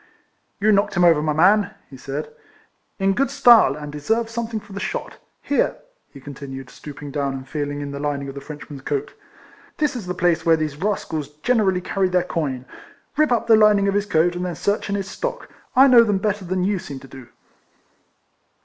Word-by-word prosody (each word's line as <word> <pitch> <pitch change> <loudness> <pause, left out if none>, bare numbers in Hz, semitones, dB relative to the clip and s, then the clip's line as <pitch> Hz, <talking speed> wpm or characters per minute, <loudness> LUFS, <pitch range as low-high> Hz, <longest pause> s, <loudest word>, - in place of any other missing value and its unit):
" - - -46
You 215 +2 +3
knocked 200 0 +2
him 175 - +3
over, 165 -3 +5
my 155 0 0
man," 195 +6 +3
he 135 - -13
said, 135 +3 -6 0.3
" - - -45
in 195 0 +2
good 275 +7 +1
style, 230 - +6
and 150 -1 -7
deserve 225 +10 -1
something 230 -1 -3
for 200 - -14
the 200 - -5
shot. - - -5 0.2
Here," 285 - +1 0.4
he 140 - -12
continued, 135 -1 -9
stooping 145 -1 -9
down, 140 -1 -1
and 130 0 -8
feeling 145 0 -3
in 140 -1 -5
the 140 - -6
lining 140 -1 -2
of 135 - -6
the 140 - -8
Frenchman's 145 -1 -9
coat, 145 +1 -3 0.6
"this 300 -2 0
is 220 -7 -6
the 180 - -3
place 175 -2 +1
where 165 -1 +4
these 155 -2 -3
rascals 160 -6 -2
generally 210 -7 +2
carry 190 +1 0
their 180 -1 +2
coin. 140 -8 -3 0.5
Rip 305 -2 +2
up 235 -1 +2
the 225 -1 +6
lining 210 -2 +5
of 200 - +1
his 205 0 0
coat, 175 -1 +2
and 180 - -3
then 180 -2 -3
search 205 +5 -1
in 200 - 0
his 195 -1 -3
stock. - - -5 0.3
I 265 +2 +8
know 245 -3 +7
them 210 -3 +1
better 205 0 -2
than 185 +1 -1
you 195 0 0
seem 140 -4 -8
to 135 - -12
do." 130 -3 -12
180 Hz, 210 wpm, -22 LUFS, 145-210 Hz, 0.6 s, I